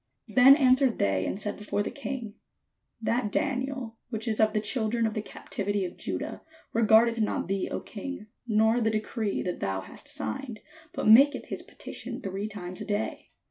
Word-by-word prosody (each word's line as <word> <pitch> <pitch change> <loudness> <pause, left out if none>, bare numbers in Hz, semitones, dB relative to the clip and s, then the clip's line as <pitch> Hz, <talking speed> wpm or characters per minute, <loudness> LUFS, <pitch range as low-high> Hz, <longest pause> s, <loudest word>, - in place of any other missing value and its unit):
Then 265 +2 +8
answered 260 -3 +4
they 95 -1 +1
and 195 - -3
said 205 -1 -3
before 210 -1 -1
the - - -4
king: 265 -6 -5 0.7
"That 225 -1 0
Daniel, 260 -4 -2
which 220 -1 -4
is 220 -2 0
of 215 -1 +4
the 215 - +2
children 225 +1 0
of 220 - 0
the 215 - -2
captivity 205 -1 -3
of 180 - -6
Judah, - - -4 0.3
regardeth 230 +1 +5
not 215 - 0
thee, 195 0 -1
O - - -2
king, 225 +1 -7 0.2
nor 220 +2 +3
the 220 - +3
decree 215 -1 -2
that 180 - -3
thou 95 0 -1
hast 95 - -12
signed, 275 -5 -5 0.3
but - - -2
maketh 275 +7 +6
his - - -3
petition - - -8
three 195 +2 -4
times 185 -4 -7
a - - -4
day." 210 +1 -3
220 Hz, 180 wpm, -28 LUFS, 205-250 Hz, 0.7 s, Then